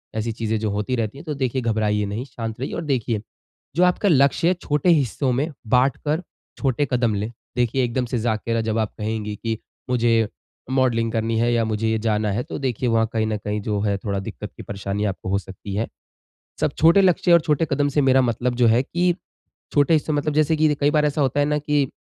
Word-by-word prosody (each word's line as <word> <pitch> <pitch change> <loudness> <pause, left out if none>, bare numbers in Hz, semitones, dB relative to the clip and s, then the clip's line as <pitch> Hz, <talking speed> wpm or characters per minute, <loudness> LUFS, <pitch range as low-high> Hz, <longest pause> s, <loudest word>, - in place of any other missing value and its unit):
ऐसी 110 +1 -1
चीज़ें 110 0 -2
जो 110 0 -1
होती 105 +5 -1
रहती 115 +1 -2
हैं, 150 - -11
तो 155 - -3
देखिये 130 -2 -1
घबराइए 105 -3 0
नहीं, 105 +5 -4
शांत 115 -5 -6
रहिए 135 - -4
और - - -3
देखिए, 120 -7 -1 0.5
जो 175 - +4
आपका 180 +3 +3
लक्ष्य 140 +1 +4
है 180 - +4
छोटे 150 +4 +1
हिस्सों 140 -4 +2
में 135 +5 0 0.3
बाँटकर 140 +5 +1 0.4
छोटे 135 +1 +1
कदम 120 -3 +2
लें। 105 +3 -3 0.2
देखिए, 125 +1 +1
एकदम 125 +1 -1
से 120 +1 -2
जा 110 0 +1
कर 115 +1 -1
जब 110 0 -1
आप 110 -2 -1
कहेंगी 105 -1 -3
कि 115 +1 -3 0.3
मुझे 115 -3 +3 0.4
मॉडलिंग 120 -4 +2
करनी 115 0 0
है 120 +1 +2
या 115 -1 +2
मुझे 110 +1 0
जाना 110 -1 0
है 110 +5 -1
तो - - -6
देखिए 125 -2 -1
वहाँ 115 -1 +2
कहीं 110 -1 +1
न 110 -1 -1
कहीं 105 +1 -3
जो 105 0 -1
है 100 -1 0
थोड़ा 100 0 -3
दिक्कत 95 - -7
कि - - -8
परेशानी 100 +1 -3
आपको 95 -2 -3
हो 100 - +2
सकती 95 +1 -8
है। 110 +3 -1 0.7
सब - - +1
छोटे 165 +5 +6
लक्ष्य 180 -1 +3
और 170 - +7
छोटे 155 0 +1
कदम 145 0 +2
से 145 +1 +1
मेरा 135 0 +5
मतलब 125 +1 0
जो 120 -1 +4
है 115 +2 +4
कि 175 +5 +1 0.6
छोटे 145 +2 +4
हिस्सों 155 0 +1
में - - +1
मतलब 150 0 -2
जैसे 155 +1 +3
कि 155 -1 +3
कई 145 0 +4
बार 150 0 +2
ऐसा 150 +1 -1
होता 140 +1 +2
है 145 - +3
न 150 0 +1
कि, 145 -2 0
120 Hz, 225 wpm, -22 LUFS, 110-145 Hz, 0.7 s, और